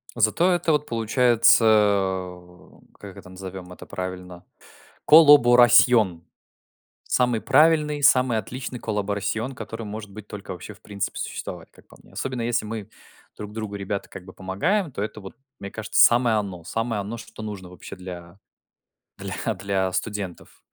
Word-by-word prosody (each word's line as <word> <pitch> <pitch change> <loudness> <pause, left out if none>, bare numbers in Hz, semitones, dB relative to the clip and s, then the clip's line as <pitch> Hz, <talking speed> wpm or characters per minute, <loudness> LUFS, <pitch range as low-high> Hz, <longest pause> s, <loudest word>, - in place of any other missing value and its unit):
Зато 120 - +2
это 175 -2 +1
вот 150 -1 +1
получается 115 0 +3
в 95 -4 0 0.2
как 100 -1 -11
это 90 - -12
назовем 95 -1 -9
это - - -12
правильно? 90 -1 -7 0.6
colaboración. 120 - +6 0.8
Самый 125 -3 +1
правильный, 150 0 +3
самый 125 -5 +4
отличный 125 +1 -7
colaboración, 105 +4 -3
который 115 -1 -7
может 105 0 -7
быть 105 +1 -11
только 100 -1 -9
вообще 90 +4 -8
в - - -23
принципе 100 -2 -5
существовать, - - -6
как - - -22
по - - -18
мне. - - -22
Особенно 130 -2 -4
если 115 -1 -1
мы 110 -1 -6 0.5
друг 105 0 -8
другу, 110 -2 -5
ребята, 100 0 -5
как 90 - -11
бы 95 - -12
помогаем, 150 - -1
то 105 - -4
это 105 0 -6
вот, 95 - -11 0.2
мне 100 - -7
кажется, 110 +2 0
самое 120 -2 +4
оно. 95 -5 -5
Самое 115 +4 -3
оно, 110 +4 -6
что 110 -1 -11
нужно 100 -4 -7
вообще 90 - -11
для, 90 0 -10 1.1
для - - 0
для 95 -2 -2
студентов. 95 -1 -5
105 Hz, 150 wpm, -23 LUFS, 95-120 Hz, 1.1 s, colaboración